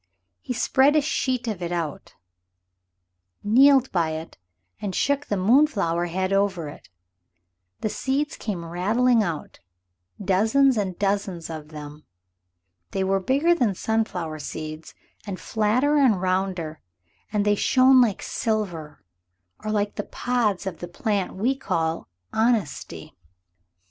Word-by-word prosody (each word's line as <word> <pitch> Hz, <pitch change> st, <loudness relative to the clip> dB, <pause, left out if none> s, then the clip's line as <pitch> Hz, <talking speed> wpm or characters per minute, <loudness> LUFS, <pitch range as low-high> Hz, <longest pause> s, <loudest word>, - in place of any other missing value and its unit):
He -, -, -4 dB
spread 270 Hz, +4 st, +3 dB
a 305 Hz, -, +5 dB
sheet 255 Hz, -4 st, -1 dB
of 210 Hz, -5 st, -3 dB
it 175 Hz, 0 st, -3 dB
out, 165 Hz, -4 st, -4 dB, 1.3 s
kneeled 265 Hz, +5 st, +5 dB
by 165 Hz, -3 st, 0 dB
it 160 Hz, -8 st, -8 dB, 0.4 s
and 195 Hz, -3 st, -3 dB
shook 285 Hz, +1 st, 0 dB
the 205 Hz, -, -1 dB
moonflower 195 Hz, -, +2 dB
head 185 Hz, +2 st, -1 dB
over 190 Hz, -6 st, 0 dB
it. -, -, -13 dB, 0.9 s
The 215 Hz, -, 0 dB
seeds 275 Hz, +6 st, -1 dB
came 185 Hz, -6 st, -4 dB
rattling 220 Hz, +8 st, +2 dB
out 170 Hz, -7 st, -4 dB, 0.6 s
dozens 220 Hz, +8 st, +3 dB
and 190 Hz, -5 st, -2 dB
dozens 195 Hz, -4 st, -1 dB
of 155 Hz, -2 st, -7 dB
them. 150 Hz, -1 st, -10 dB, 0.9 s
They 190 Hz, -, -1 dB
were 195 Hz, +1 st, +1 dB
bigger 280 Hz, -, +2 dB
than 235 Hz, -, +1 dB
sunflower 180 Hz, -8 st, -2 dB
seeds 155 Hz, +1 st, -7 dB, 0.3 s
and 190 Hz, -2 st, -5 dB
flatter 245 Hz, +8 st, +1 dB
and 250 Hz, -9 st, +4 dB
rounder, 185 Hz, -4 st, -2 dB, 0.5 s
and 210 Hz, -1 st, 0 dB
they 205 Hz, -, +4 dB
shone 255 Hz, +4 st, +5 dB
like 220 Hz, -6 st, +1 dB
silver, 175 Hz, -9 st, -3 dB, 0.6 s
or 215 Hz, -, -3 dB
like 205 Hz, -1 st, -1 dB
the 205 Hz, -, -1 dB
pods 225 Hz, -6 st, -1 dB
of 185 Hz, -4 st, -5 dB
the 175 Hz, -, -6 dB
plant 195 Hz, +2 st, -2 dB
we 240 Hz, +8 st, +1 dB
call 165 Hz, -11 st, -2 dB, 0.3 s
honesty. 220 Hz, -, -1 dB
205 Hz, 130 wpm, -24 LUFS, 175-245 Hz, 1.3 s, a